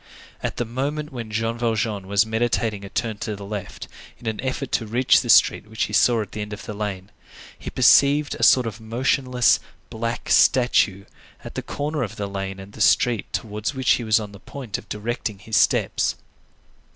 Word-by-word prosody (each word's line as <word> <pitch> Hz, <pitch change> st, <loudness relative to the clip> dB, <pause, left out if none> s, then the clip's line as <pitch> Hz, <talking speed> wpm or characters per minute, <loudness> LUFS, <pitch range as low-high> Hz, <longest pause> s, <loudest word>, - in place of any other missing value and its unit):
At -, -, -3 dB
the 120 Hz, -, -1 dB
moment 145 Hz, +6 st, -3 dB
when 115 Hz, -3 st, -6 dB
Jean 115 Hz, +2 st, -2 dB
Valjean 110 Hz, -4 st, -1 dB
was 100 Hz, +2 st, +3 dB
meditating 110 Hz, -2 st, -1 dB
a 100 Hz, -, -8 dB
turn 115 Hz, -1 st, -2 dB
to 110 Hz, -2 st, -3 dB
the 100 Hz, 0 st, -9 dB
left, 100 Hz, -1 st, -6 dB, 0.3 s
in -, -, -16 dB
an 110 Hz, -2 st, -2 dB
effort 135 Hz, +1 st, -3 dB
to 115 Hz, -, -1 dB
reach 120 Hz, +4 st, +3 dB
the -, -, -7 dB
street -, -, +5 dB
which 110 Hz, +1 st, -2 dB
he -, -, -4 dB
saw 115 Hz, -3 st, +4 dB
at -, -, -14 dB
the 105 Hz, -, -5 dB
end 105 Hz, 0 st, -5 dB
of 105 Hz, -, -8 dB
the 105 Hz, -, -5 dB
lane, 100 Hz, -2 st, -5 dB, 0.5 s
he -, -, -6 dB
perceived 140 Hz, +4 st, +4 dB
a -, -, -7 dB
sort 125 Hz, -2 st, +6 dB
of 110 Hz, 0 st, -6 dB
motionless, 125 Hz, +2 st, +2 dB, 0.3 s
black 115 Hz, +1 st, -4 dB
statue 105 Hz, -6 st, +3 dB, 0.4 s
at -, -, -9 dB
the -, -, -3 dB
corner 150 Hz, +1 st, -3 dB
of 110 Hz, -6 st, -3 dB
the 100 Hz, -, -3 dB
lane 95 Hz, -1 st, -5 dB
and 95 Hz, +1 st, -11 dB
the -, -, -8 dB
street 120 Hz, -4 st, +3 dB
towards 105 Hz, +5 st, -3 dB
which 130 Hz, 0 st, +1 dB
he 120 Hz, -, +2 dB
was 110 Hz, 0 st, +3 dB
on 105 Hz, -2 st, -7 dB
the 100 Hz, -, -12 dB
point 125 Hz, -1 st, -6 dB
of 110 Hz, -, -17 dB
directing 110 Hz, 0 st, -4 dB
his 105 Hz, +3 st, -5 dB
steps. -, -, +2 dB
110 Hz, 200 wpm, -23 LUFS, 105-125 Hz, 0.5 s, sort